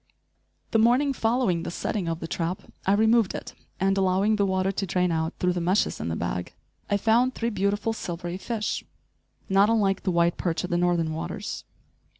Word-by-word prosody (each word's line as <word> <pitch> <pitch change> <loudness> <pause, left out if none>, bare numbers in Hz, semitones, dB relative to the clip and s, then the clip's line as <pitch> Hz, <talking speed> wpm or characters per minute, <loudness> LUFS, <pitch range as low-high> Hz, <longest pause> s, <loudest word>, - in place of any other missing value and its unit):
* - - -45
The 225 - +3
morning 250 +5 +4
following 225 -8 +1
the - - -4
setting 180 +1 -3
of 165 0 -3
the 165 - -4
trap 170 +2 -3 0.2
I 195 - +5
removed 220 0 +3
it - - -7 0.3
and, 195 +1 +2
allowing 195 +3 +2
the 200 -1 +1
water 190 0 +1
to 195 0 -2
drain 180 0 +1
out 160 0 -1
through 180 0 +1
the 175 - -2
meshes 185 +5 +1
in - - -3
the 80 - -2
bag, 90 +1 -3 0.3
I 205 - +2
found 235 +5 +2
three 235 +1 -1
beautiful 205 +2 0
silvery 175 -3 -5
fish, 215 +2 -3 0.6
not 195 +2 +4
unlike 200 -4 +2
the - - -1
white 170 -1 +2
perch 170 0 -1
of 180 - -4
the - - +2
northern 170 -2 +1
waters. 175 +5 -5
190 Hz, 195 wpm, -26 LUFS, 175-215 Hz, 0.6 s, I